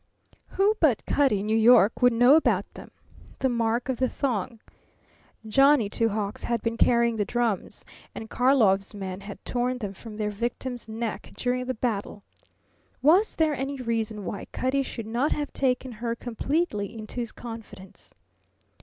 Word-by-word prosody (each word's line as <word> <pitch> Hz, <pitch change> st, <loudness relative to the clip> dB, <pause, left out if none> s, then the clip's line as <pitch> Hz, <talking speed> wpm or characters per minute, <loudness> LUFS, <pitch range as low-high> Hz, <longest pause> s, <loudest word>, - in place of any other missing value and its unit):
Who 405 Hz, +3 st, +4 dB
but 280 Hz, -9 st, +2 dB
Cutty 265 Hz, -9 st, +2 dB
in -, -, -4 dB
New 215 Hz, +1 st, +1 dB
York 225 Hz, 0 st, +5 dB
would 245 Hz, 0 st, +6 dB
know 245 Hz, +4 st, +6 dB
about 320 Hz, -, +2 dB
them? -, -, -11 dB, 0.5 s
The 265 Hz, -, +1 dB
mark 235 Hz, 0 st, 0 dB
of 260 Hz, -2 st, -1 dB
the 255 Hz, 0 st, +1 dB
thong. 235 Hz, -4 st, -2 dB, 0.9 s
Johnny 270 Hz, -2 st, +4 dB
Two 230 Hz, +1 st, +1 dB
Hawks 205 Hz, -1 st, -4 dB
had 235 Hz, -2 st, -1 dB
been 230 Hz, 0 st, -1 dB
carrying 235 Hz, -1 st, +3 dB
the 210 Hz, -, +1 dB
drums, 230 Hz, -2 st, -2 dB, 0.3 s
and 220 Hz, -, -7 dB
Karlov's 220 Hz, -7 st, +2 dB
men 190 Hz, -1 st, -6 dB
had 200 Hz, 0 st, -10 dB
torn 250 Hz, +1 st, -1 dB
them 205 Hz, -5 st, -5 dB
from 210 Hz, +2 st, -10 dB
their 210 Hz, -1 st, -1 dB
victim's 240 Hz, +2 st, -4 dB
neck 220 Hz, -2 st, -5 dB
during 250 Hz, 0 st, -1 dB
the 255 Hz, -, -3 dB
battle. 210 Hz, -3 st, -3 dB, 0.8 s
Was 360 Hz, +9 st, +4 dB
there 315 Hz, -2 st, +2 dB
any 275 Hz, +1 st, -3 dB
reason 225 Hz, -4 st, -2 dB
why 200 Hz, -, -5 dB
Cutty 260 Hz, +2 st, 0 dB
should 235 Hz, -4 st, -6 dB
not 240 Hz, +7 st, 0 dB
have 295 Hz, -1 st, -4 dB
taken 260 Hz, -1 st, 0 dB
her 230 Hz, +1 st, -3 dB
completely 235 Hz, -, -2 dB
into 215 Hz, +2 st, -9 dB
his 235 Hz, -2 st, -4 dB
confidence? 225 Hz, -5 st, -11 dB
235 Hz, 165 wpm, -26 LUFS, 215-255 Hz, 0.9 s, would